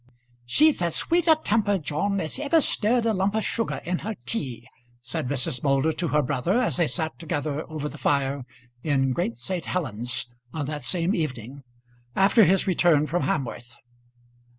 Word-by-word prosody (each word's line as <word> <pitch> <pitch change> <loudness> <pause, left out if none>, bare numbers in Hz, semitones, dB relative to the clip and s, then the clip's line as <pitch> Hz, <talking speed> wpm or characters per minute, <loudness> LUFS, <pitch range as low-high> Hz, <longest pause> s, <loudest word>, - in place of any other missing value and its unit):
"She's 300 - +4
as 170 -2 0
sweet 345 0 +1
a 320 - +7
temper, 205 -2 +2
John, 180 +5 -1
as 160 +8 0
ever 290 +3 +3
stirred 235 -4 +2
a 225 - +2
lump 195 +1 0
of 220 - +1
sugar 230 - -1
in 180 0 -1
her 220 +2 -4
tea," 130 - -4 0.3
said 135 +4 -4
Mrs. 130 -2 -1
Moulder 140 +2 +2
to 170 +2 -2
her 150 0 +2
brother, 145 - 0
as 250 - 0
they 170 -3 +2
sat 160 -1 -2
together 150 -1 -3
over 155 -2 -4
the - - -9
fire 140 -1 0 0.4
in 135 -3 +1
Great 120 -7 -2
St. 175 +9 -3
Helen's 120 - -3 0.3
on 150 -3 -2
that 150 -1 -5
same 175 +6 0
evening, 135 - -4 0.5
after 200 +3 +5
his 190 +3 +3
return 170 -5 +3
from 175 +3 -1
Hamworth. 120 -8 -3
160 Hz, 175 wpm, -25 LUFS, 140-195 Hz, 0.5 s, a